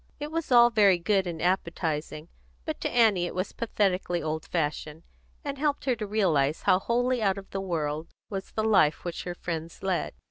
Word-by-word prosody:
It 295 +1 -5
was 330 -3 -3
all 240 -1 +7
very 205 -5 +5
good 190 +2 +1
and 165 -2 -4
appetising; 160 -3 -1 0.4
but - - -4
to - - -1
Annie 215 -7 +3
it - - -7
was 185 +2 -2
pathetically 190 -6 0
old 155 0 -3
fashioned, 155 -1 -3 0.4
and 280 -1 -4
helped 290 -1 0
her 255 -3 +2
to 215 -1 -4
realise 165 -9 +1
how 185 - +4
wholly 245 +3 0
out 195 -2 +2
of 195 -1 -10
the 195 - -3
world 160 -4 -2 0.2
was 195 -2 -5
the 215 - -2
life 195 -9 +3
which 175 - -4
her 175 -1 -4
friends 165 -1 -6
led. 175 - -1
190 Hz, 190 wpm, -27 LUFS, 165-220 Hz, 0.4 s, all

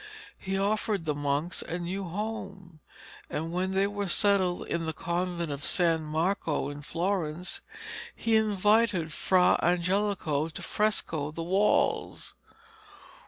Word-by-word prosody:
He 195 0 -2
offered 205 -2 0
the 150 - +1
monks 145 +4 -1
a 175 - -4
new 185 +3 -3
home, 195 -3 -5 0.5
and, 165 +2 -3
when 185 +1 0
they 190 +1 +2
were 205 0 -2
settled 190 -1 +2
in 165 -1 -2
the 160 - -1
convent 170 0 -2
of 140 +1 -5
San 170 -3 +2
Marco 155 -1 -1
in 145 0 -7
Florence, 175 +1 -2 0.5
he 225 -1 +1
invited 210 -5 +3
Fra 180 +2 +3
Angelico 180 -3 +1
to 155 - -8
fresco 170 -8 0
the 165 +2 -5
walls. 190 +5 +1
180 Hz, 125 wpm, -29 LUFS, 160-200 Hz, 0.5 s, invited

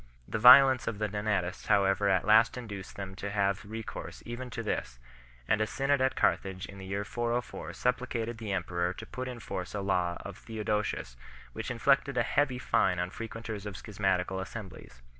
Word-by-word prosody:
The - - -2
violence 130 +2 +8
of 110 - -2
the 105 0 0
L)onatists 100 -3 -2
however 100 -1 +3
at 95 -2 +2
last 110 +3 +5
induced 105 -6 -7
them 95 -1 -6
to 100 - -4
have 100 -1 0
recourse 110 +2 -7
even 120 +2 -6
to 115 -1 -5
this, 65 - -3 0.5
and 105 - +2
a 110 - +1
Synod 140 +2 +1
at 130 0 +2
Carthage 95 -1 0
in 100 0 -11
the 95 - -8
year 100 +1 -2
404 120 +2 -3
supplicated 120 -2 -1
the 110 -3 -4
emperor 90 -1 -1
to - - -8
put 130 0 -5
in 125 -2 -6
force 95 -3 -5
a 100 - -2
law 90 -3 0
of - - -8
Theodosius 105 - -2 0.4
which - - -5
inflicted 135 +2 +2
a 120 - +4
heavy 135 0 +1
fine 95 -7 +2
on 90 +1 -2
frequenters 115 -2 -6
of 100 - -6
schismatical 95 -2 -1
as 95 - -6
semblies 95 - -9
2 - - -26
105 Hz, 190 wpm, -30 LUFS, 95-120 Hz, 0.5 s, violence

